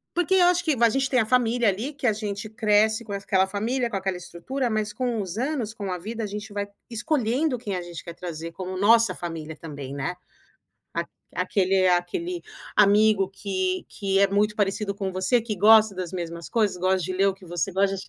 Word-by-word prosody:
Porque 355 Hz, +2 st, +2 dB
eu 365 Hz, -, +6 dB
acho 355 Hz, 0 st, +3 dB
que 310 Hz, -5 st, +2 dB
va 235 Hz, -, +5 dB
a 230 Hz, -, +3 dB
gente 270 Hz, +2 st, +1 dB
tem 255 Hz, -2 st, +3 dB
a 220 Hz, -, +1 dB
família 240 Hz, -1 st, +2 dB
ali 220 Hz, +10 st, -1 dB
que 275 Hz, -3 st, -3 dB
a 220 Hz, -, +4 dB
gente 210 Hz, 0 st, -4 dB
cresce 220 Hz, 0 st, +2 dB
com 205 Hz, -2 st, -5 dB
es 200 Hz, -, -5 dB
aquela 190 Hz, -1 st, +3 dB
família, 235 Hz, +6 st, -1 dB
com 220 Hz, -, -4 dB
aquela 190 Hz, -1 st, -2 dB
estrutura, 245 Hz, +10 st, -3 dB
mas 215 Hz, -2 st, -1 dB
com 245 Hz, -4 st, -1 dB
os 190 Hz, +1 st, -6 dB
anos, 255 Hz, -4 st, -1 dB
com 200 Hz, -4 st, -5 dB
a 180 Hz, -, -1 dB
vida, 225 Hz, +5 st, -5 dB
a 215 Hz, -, -1 dB
gente 210 Hz, +1 st, -6 dB
vai 205 Hz, 0 st, -3 dB, 0.2 s
escolhendo 255 Hz, +2 st, 0 dB
quem 210 Hz, -4 st, -4 dB
a 180 Hz, -, -3 dB
gente 175 Hz, -1 st, -8 dB
quer 170 Hz, -, -7 dB
trazer 165 Hz, -2 st, -6 dB
como 185 Hz, +1 st, -5 dB
nossa 230 Hz, +3 st, +5 dB
família 160 Hz, -2 st, -6 dB
também, 145 Hz, -4 st, -7 dB
né. 140 Hz, +5 st, -3 dB, 0.8 s
Aq -, -, -2 dB, 0.3 s
aquele 190 Hz, -2 st, +2 dB
aquele 180 Hz, -, 0 dB, 0.3 s
amigo 205 Hz, -1 st, +5 dB
que 190 Hz, -2 st, -2 dB
que 195 Hz, -1 st, -1 dB
é 200 Hz, -, +5 dB
muito 205 Hz, +2 st, +1 dB
parecido 200 Hz, 0 st, 0 dB
com 195 Hz, -1 st, -3 dB
você, 190 Hz, +6 st, +2 dB
que 220 Hz, -2 st, -4 dB
gosta 215 Hz, +1 st, +6 dB
das 180 Hz, -2 st, -4 dB
mesmas 170 Hz, -2 st, -5 dB
coisas, 215 Hz, -5 st, +1 dB
gosta 185 Hz, +1 st, +2 dB
de 185 Hz, +1 st, -3 dB
ler 195 Hz, +2 st, +3 dB
o 195 Hz, -, +2 dB
que 190 Hz, -1 st, -16 dB
você 175 Hz, +3 st, -2 dB
gosta. 195 Hz, +1 st, +1 dB
205 Hz, 220 wpm, -25 LUFS, 185-230 Hz, 0.8 s, eu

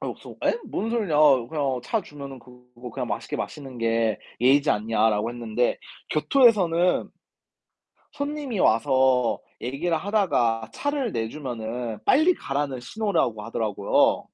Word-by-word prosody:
아니 -, -, -3 dB
그래서 -, -, -13 dB
"예? 470 Hz, -, +2 dB
뭔 220 Hz, +4 st, -3 dB
소리냐 210 Hz, -10 st, 0 dB, 0.3 s
그냥 140 Hz, -5 st, -1 dB
차 225 Hz, -, 0 dB
주면은 140 Hz, -4 st, -9 dB
그거 125 Hz, 0 st, -13 dB
그냥 -, -, -4 dB
맛있게 -, -, -3 dB
마시는 135 Hz, -4 st, -6 dB
게 115 Hz, -1 st, +1 dB, 0.2 s
예의지 140 Hz, +4 st, +4 dB
않냐."라고 110 Hz, +1 st, +1 dB
했는데 120 Hz, 0 st, -1 dB, 0.3 s
교토에서는 180 Hz, -, +3 dB, 1.0 s
손님이 285 Hz, -6 st, -3 dB
와서 130 Hz, -1 st, +3 dB, 0.2 s
얘기를 155 Hz, +7 st, -1 dB
하다가 155 Hz, -, +1 dB
차를 285 Hz, -6 st, -2 dB
내주면은 115 Hz, -2 st, -4 dB
빨리 315 Hz, +7 st, +4 dB
가라는 140 Hz, -2 st, -3 dB
신호라고 165 Hz, -, -1 dB
하더라고요. 110 Hz, -4 st, +1 dB
130 Hz, 305 characters per minute, -25 LUFS, 115-180 Hz, 1.0 s, 예의지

